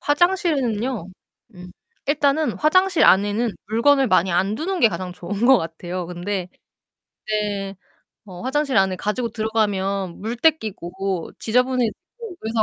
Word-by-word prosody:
화장실은요. 270 - 0 0.5
음 180 0 -11 0.4
일단은 290 +1 +2
화장실 370 +3 +3
안에는 205 +4 +3 0.2
물건을 270 +4 +3
많이 185 -1 +3
안 190 +4 +1
두는 370 +3 -2
게 230 - +6
가장 185 -4 -5
좋은 200 +6 -3
것 265 -1 +7
같아요. 175 +2 -5
근데 180 +1 -4 0.8
이제 205 -2 -2 0.5
어 180 -2 -10
화장실 275 +1 0
안에 190 -1 +3
가지고 230 +5 -2
들어가면 200 -4 -1
물때 235 +9 +3
끼고 190 - -4
지저분해지고 250 0 +1 0.5
그래서 220 0 0
215 Hz, 295 characters per minute, -22 LUFS, 190-265 Hz, 0.8 s, 것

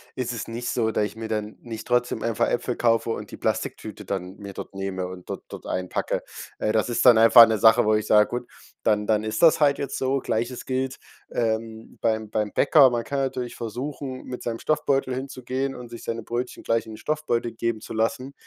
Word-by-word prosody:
ist 125 -2 -2
es 115 - -5
nicht 120 +1 -4
so, 110 -2 +1
dass 105 - +1
ich 105 - -7
mir 115 0 -5
dann 105 -1 -3
nicht 115 -2 -8
trotzdem 120 -2 +1
einfach 115 -2 +1
Äpfel 120 0 -1
kaufe 115 -1 +2
und - - -5
die - - -8
Plastiktüte - - -3
dann 95 -1 -4
mir 100 -1 -8
dort - - -8
nehme 95 -1 -3
und 90 -1 -10
dort - - -5
dort - - -9
einpacke. 90 -1 -2 0.4
Äh, 105 - +1
das 110 +1 +1
ist 120 - 0
dann 120 -2 +8
einfach 115 +1 +9
'ne 110 - +1
Sache, 110 +1 +6
wo 110 - +3
ich 105 - 0
sag: 105 0 +5
„Gut, 120 0 -3 0.4
dann 105 -1 +2
dann 110 -1 +2
ist 110 0 -2
das 165 -2 +6
halt 140 -1 +4
jetzt 140 -1 -3
so.“ 135 +1 0
Gleiches 120 +1 -2
gilt, 130 0 -2 0.3
ähm, 110 -1 -3
beim 110 -1 0
beim 105 -1 -1
Bäcker. 140 -2 +6
Man 120 -1 -1
kann 140 0 -2
natürlich 130 -2 -2
versuchen, 130 +3 -5
mit 125 -1 -7
seinem 115 -1 -3
Stoffbeutel 140 -4 +1
hinzugehen 130 0 -3
und 125 -1 -9
sich 115 0 -9
seine 115 0 -4
Brötchen 120 +3 -4
gleich 115 0 +1
in 110 - -10
den - - -9
Stoffbeutel 135 -5 -1
geben 115 -1 -2
zu - - -8
lassen. 115 +4 -1
115 Hz, 220 wpm, -25 LUFS, 110-130 Hz, 0.4 s, einfach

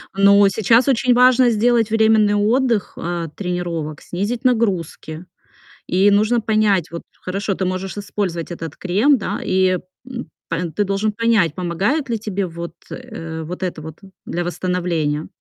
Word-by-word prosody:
Но 200 0 +6
сейчас 225 +6 +3
очень 250 -1 +3
важно 250 0 +5
сделать 230 0 +2
временный 220 -2 +3
отдых, 225 +1 +1
а, 170 -1 -3
тренировок, 175 -5 -4
снизить 205 +8 -3
нагрузки. 185 - -1 0.6
И 190 +3 +3
нужно 220 +3 +3
понять 210 -5 +2
вот, 170 - -6 0.2
хорошо, 195 +2 -2
ты 190 - -2
можешь 185 +2 -3
использовать 185 -5 -3
этот 165 -2 -6
крем, 215 +10 +3
да, 205 - -3
и, 185 0 +2 0.3
м, 245 -1 -7 0.2
па 165 +1 -1
ты 205 - +2
должен 200 +2 0
понять, 210 -7 +2
помогает 200 - -1
ли 230 - 0
тебе 200 -3 -2
вот, 170 0 -7 0.2
э, 165 -10 -7
вот 175 +3 -7
это 170 -4 -3
вот 160 +1 -9 0.3
для 175 - -3
восстановления. 170 -4 -2
200 Hz, 150 wpm, -20 LUFS, 175-225 Hz, 0.6 s, Но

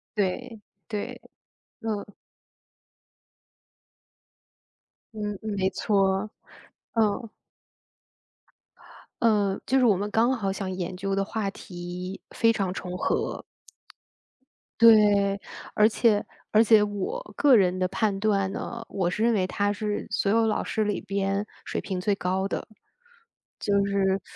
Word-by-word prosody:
对， 215 +3 -2 0.3
对， 210 -3 -4 0.6
嗯。 210 -2 -4 3.0
嗯 210 -2 -4
嗯， 220 - -4
没 190 0 +2
错。 195 0 +1 0.6
嗯。 225 +1 +1 1.9
呃， 205 -4 +2
就 265 - +3
是 255 - +4
我 210 -5 +5
们 205 +2 -3
刚 230 +4 +3
好 195 -3 -1
想 195 -1 -4
研 185 -1 -4
究 195 +1 -2
的 195 0 +1
话 210 -1 -2
题 180 0 -7
非 230 0 +3
常 195 -4 -1
重 180 -1 -5
合。 - - -1 1.4
对， 205 -3 +6 0.3
而 210 +1 +5
且 215 -2 +2 0.3
而 215 +1 +6
且 220 -1 +6
我 205 - -2 0.2
个 285 -3 +6
人 185 -3 +3
的 185 - +2
判 195 +1 0
断 200 -2 +1
呢， 235 0 -5
我 185 -3 -1
是 210 - -2
认 235 +1 +4
为 190 -4 +1
他 205 +2 0
是 210 0 -3
所 200 0 +1
有 225 +1 +3
老 215 - 0
师 220 - -1
里 205 -1 -1
边 195 +1 -1 0.2
水 - - -3
平 185 -2 -4
最 200 +2 +1
高 190 +1 -1
的。 - - -4 0.9
就 205 - -1
是 195 -1 +1
205 Hz, 140 characters per minute, -26 LUFS, 195-220 Hz, 3.0 s, 对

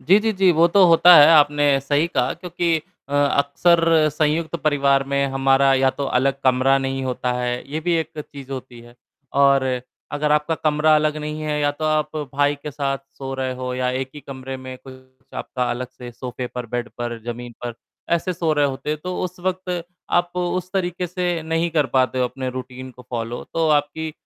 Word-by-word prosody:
जी, 190 +5 +5
जी, 220 +1 0
जी, 190 -2 +3
वो 165 +2 +5
तो 190 +2 +5
होता 175 +1 +7
है 145 - +9
आपने 145 -1 +4 0.2
सही 145 +4 +1
कहा 130 -5 0
क्योंकि 175 -1 -1 0.3
अ, 145 - -5
अक्सर 155 +3 +3
संयुक्त 155 +2 0
परिवार 140 -3 +3
में 140 0 +2
हमारा 135 0 +3
या 130 0 +3
तो 140 - -4
अलग 135 +1 0
कमरा 130 +1 +4
नहीं 135 0 -3
होता 125 -1 -2
है। 125 0 -2
ये 155 - -2
भी 175 +1 0
एक 160 -1 -4
चीज़ 140 -2 -9
होती 130 -2 -8
है 120 0 -16 0.5
और 140 -1 +5 0.5
अगर 150 0 0
आपका 150 +2 +1
कमरा 155 0 +2
अलग 150 0 +1
नहीं 150 0 -5
है 150 -1 -1
या 145 0 +2
तो 150 +2 -6
आप 155 0 0 0.2
भाई 145 0 +2
के 150 - -5
साथ 135 -1 -2 0.2
सो 135 -1 -5
रहे 130 -1 -2
हो 125 0 -4
या 125 0 -1
एक 130 +1 -3
ही 150 - -8
कमरे 135 -1 -7
में 130 0 -8
कुछ 130 0 -17
आपका 125 -2 -3
अलग 125 +1 -4
से 125 -1 -10
सोफे 125 +1 -6
पर, 125 -1 -6
बेड 120 +1 -3
पर, 120 -1 -4
ज़मीन 120 0 -6
पर 120 - -4 0.4
ऐसे 185 +2 -1
सो 165 -2 0
रहे 145 -1 +2
होते 135 +2 -4
हैं। 155 - -2
तो 180 0 -3
उस 180 0 -6
वक़्त 180 -1 -3 0.3
आप 175 +1 +1
उस 180 +1 -2
तरीक़े 180 -1 -1
से 175 -1 -2
नहीं 165 +1 -1
कर 150 -4 +1
पाते 130 -1 +2
हो 125 - +2
अपने 130 +1 -4
रूटीन 130 0 -8
को 125 0 -15
फ़ॉलो 120 0 -4
तो 165 -1 +1
आपकी 150 +1 0
145 Hz, 205 wpm, -21 LUFS, 130-160 Hz, 0.5 s, है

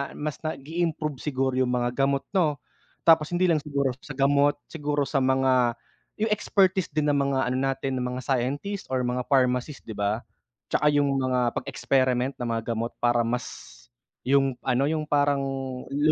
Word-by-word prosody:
mas 150 -1 -4
nagi-improve 155 -1 -3
siguro 135 -3 -1
yung 130 -1 +2
mga 120 0 0
gamot, 135 +1 +1
no? 165 -7 +2 0.5
Tapos 160 -2 +5
hindi 180 -1 +3
lang 155 - +3
siguro 140 -3 -1
sa 145 - -9
gamot 140 +1 +3 0.2
siguro 150 -2 -1
sa 135 0 0
mga, 130 -2 +2 0.4
yung 215 0 -1
expertise 190 -3 +2
din, 150 0 0
ng 145 - +2
mga 140 -1 +1
ano 130 - 0
natin 135 -1 -1
ng 125 - -1
mga 130 - -4
scientist 140 +10 -2
or 130 -1 -1
mga 125 0 -2
pharmacist, 130 +1 +1
'di 110 - -8
ba? 105 +2 -1 0.5
Tsaka 150 - +2
yung 140 -2 +2
mga 125 -2 +1
pag-experiment 130 0 0
ng 120 - -2
mga 115 -1 -1
gamot 115 +1 -3
para 120 -1 +2
mas, 125 +1 -1 0.8
yung 135 0 +2
ano 130 +2 +1
yung 155 0 -1
parang 145 -2 +2 0.5
lo 145 +2 +3
135 Hz, 170 wpm, -26 LUFS, 125-150 Hz, 0.8 s, Tapos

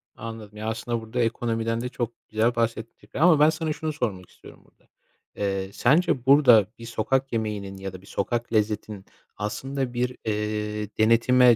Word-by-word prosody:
Anladım. 110 -2 -8
Ya, 110 +1 -5
aslında 115 +1 -3
burada 110 +2 -5
ekonomiden 115 -1 0
de 125 - -3
çok 120 -2 -3 0.2
güzel 110 +2 +1
bahsettin 115 0 -3
tabii - - -5
ama 170 -4 +6
ben 150 +1 +7
sana 160 0 -2
şunu 155 0 -3
sormak 100 - -3
istiyorum - - -16
burada. - - -30 0.5
Eee, 95 -1 -2
sence 135 -1 +2
burada 130 -7 +7
bir 115 - -8
sokak 130 +4 -1
yemeğinin 105 -3 -3
ya 95 0 -6
da 95 - -10
bir 100 - -18
sokak 120 +4 -2
lezzetinin 105 -2 -1 0.3
aslında 130 +5 -3
bir, 125 +1 -1
eee, 105 -1 -2
denetime 120 +2 +5
115 Hz, 165 wpm, -25 LUFS, 105-125 Hz, 0.5 s, ben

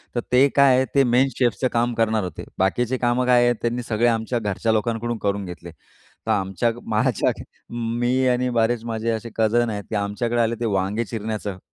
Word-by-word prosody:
तर - - +1
ते 130 +3 +6
काय 140 -2 +6
आहे, 130 +1 +2
ते 140 - +6
मेन 130 +2 +5
शेफचं 120 -1 +1
काम 120 +1 +1
करणार 110 -2 +1
होते. 90 -4 -6 0.2
बाकीची 120 +7 +1
कामं 120 +1 +1
काय 125 -1 +5
आहेत, 120 0 +2
त्यांनी 120 +1 -1
सगळे 115 +2 +2
आमच्या 115 +1 0
घरच्या 105 +1 -1
लोकांकडून 115 +1 -1
करून 100 0 0
घेतले. 90 -1 -9
तर - - -10
आमच्याग 95 +4 0 0.2
माझ्याआधी 110 +2 +1 0.6
मी 125 +2 +1
आणि 125 0 +1
बरेचं 115 0 0
माझे 115 0 -2
असे 115 +1 -4
कझन 115 +1 +2
आहेत, 105 -1 -4
की - - -3
आमच्याकडे 105 +4 -1
आले 115 0 +1
ते 120 - -2
वांगे 100 +5 -1
चिरण्याचं. 110 -3 -4
115 Hz, 190 wpm, -22 LUFS, 105-120 Hz, 0.6 s, ते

